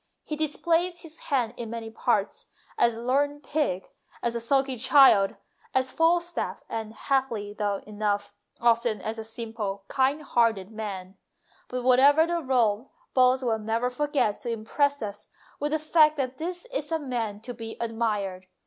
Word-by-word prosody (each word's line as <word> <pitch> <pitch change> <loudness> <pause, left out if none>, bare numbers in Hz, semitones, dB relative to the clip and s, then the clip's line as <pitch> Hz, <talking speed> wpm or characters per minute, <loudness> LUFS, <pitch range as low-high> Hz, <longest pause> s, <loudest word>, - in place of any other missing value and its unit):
He 305 - -4
displays 335 +3 0
his 320 -2 -10
hand 245 -5 +1
in 235 -2 -5
many 225 -1 -6
parts 220 -3 -1 0.3
as 235 -1 +3
a 230 - -7
learned 285 +3 +1
pig, 270 -11 -1 0.4
as 235 - 0
a 235 - -2
sulky 265 +3 +1
child, 260 -5 +6 0.4
as 260 0 +1
Falstaff, 345 +1 +1
and, 220 -1 -4
happily 230 -6 -1 0.3
enough, 205 -1 -2 0.3
often 235 -2 +2
as 225 +1 -4
a - - -4
simple, 220 -3 -5
kind 275 +3 +1
hearted 225 -7 +1
man; 195 -3 -6 0.5
but, 250 0 -4
whatever 275 +5 +6
the 340 0 -1
role, 245 -4 +1 0.2
Boswell 255 -3 +3
never 225 +3 -1
forgets 260 -5 0
to 240 - -4
impress 280 +5 0
us 205 0 -6 0.3
with 295 +1 -1
the 310 - +2
fact 310 0 +4
that 260 -1 -3
this 355 +4 -4
is 305 - -3
a 325 - +2
man 235 -8 -3
to 245 +2 -6
be 225 -1 -8
admired. 210 -5 -2
245 Hz, 155 wpm, -27 LUFS, 220-285 Hz, 0.5 s, child